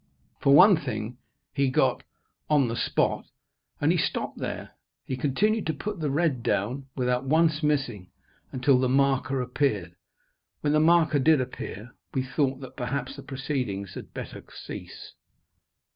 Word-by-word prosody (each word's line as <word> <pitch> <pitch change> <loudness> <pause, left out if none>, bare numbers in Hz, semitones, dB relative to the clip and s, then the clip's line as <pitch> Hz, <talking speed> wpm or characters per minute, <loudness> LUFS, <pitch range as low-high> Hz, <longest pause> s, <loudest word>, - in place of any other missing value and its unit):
For 140 0 +5
one 185 +3 +8
thing, 120 -5 -5 0.3
he 140 -2 +2
got - - +2 0.5
"on 145 -5 +3
the 115 - -2
spot," - - 0 0.5
and - - +3
he - - +2
stopped - - -2
there. - - -5 0.3
He 130 - -3
continued 200 - +1
to 160 - -1
put 205 +4 -5
the 150 -2 -1
red 145 -3 +1
down, 120 +4 -1
without 125 0 0
once 160 +2 +3
missing, 135 - -1 0.4
until 130 0 +3
the 130 -1 +1
marker 135 -1 +2
appeared. 110 - -1 0.7
When 145 0 +1
the 150 - +4
marker 160 -2 +4
did 155 +2 +5
appear, 125 -2 -6 0.2
we 130 - +1
thought 135 +1 -1
that 130 -1 -9
perhaps 130 +1 -3
the 140 - -9
proceedings 130 -8 -3
had - - -9
better - - -7
cease. - - -9
135 Hz, 150 wpm, -27 LUFS, 125-150 Hz, 0.7 s, one